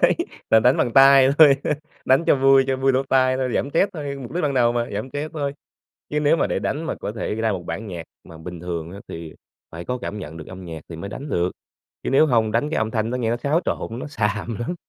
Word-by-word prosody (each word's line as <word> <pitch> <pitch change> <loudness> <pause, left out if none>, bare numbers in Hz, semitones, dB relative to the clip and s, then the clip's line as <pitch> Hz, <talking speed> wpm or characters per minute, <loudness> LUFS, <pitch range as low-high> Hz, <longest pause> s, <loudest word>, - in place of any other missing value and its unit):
Đấy - - +4 0.3
là 110 - +6
đánh 125 +4 +4
bằng 120 - 0
tay 135 0 +7
thôi, 145 -4 +8 0.5
đánh 135 +5 +3
cho - - +5
vui 135 0 +5
cho 135 -1 0
vui 135 0 +2
lỗ 130 - +2
tai 130 -1 +3
thôi, 130 -1 -1
giảm 140 - -1
stress 190 +6 +2
thôi, 145 -4 -5
mục 120 - -8
đích 180 - -1
ban 140 -2 0
đầu 120 -2 +3
mà, 120 0 -1
giảm 105 +6 -4
stress 145 +4 -5
thôi. 140 -3 -2 0.6
Chứ 150 - 0
nếu 150 +1 +3
mà - - +1
để - - -1
đánh 155 - -2
mà 165 - -3
có 105 - -5
thể 110 -1 -3
ra 110 0 0
một 90 -3 -4
bản 90 +7 -5
nhạc 85 -3 -6 0.2
mà 80 - -13
bình 85 +1 -8
thường 85 -1 -5
á, 100 - -9
thì 80 -1 -8 0.4
phải 85 +1 -8
có 125 - -2
cảm 105 -4 -6
nhận 80 -3 -8
được 80 - -10
âm 95 0 -9
nhạc 80 -2 -7
thì 85 - -7
mới 100 +5 -7
đánh 140 +8 -7
được, 90 -4 0 0.5
chứ - - -2
nếu 135 +4 +5
hông 115 -5 +2
đánh 115 +7 0
cái 160 - -2
âm 110 0 -1
thanh 110 -1 -1
nó 125 - -2
nghe 115 -2 -1
nó 120 - 0
xáo 145 +6 +1
trộn, 115 +2 -3
nó - - -6
xàm 110 -4 -2
lắm. 120 +9 -3
120 Hz, 275 wpm, -22 LUFS, 100-135 Hz, 0.6 s, thôi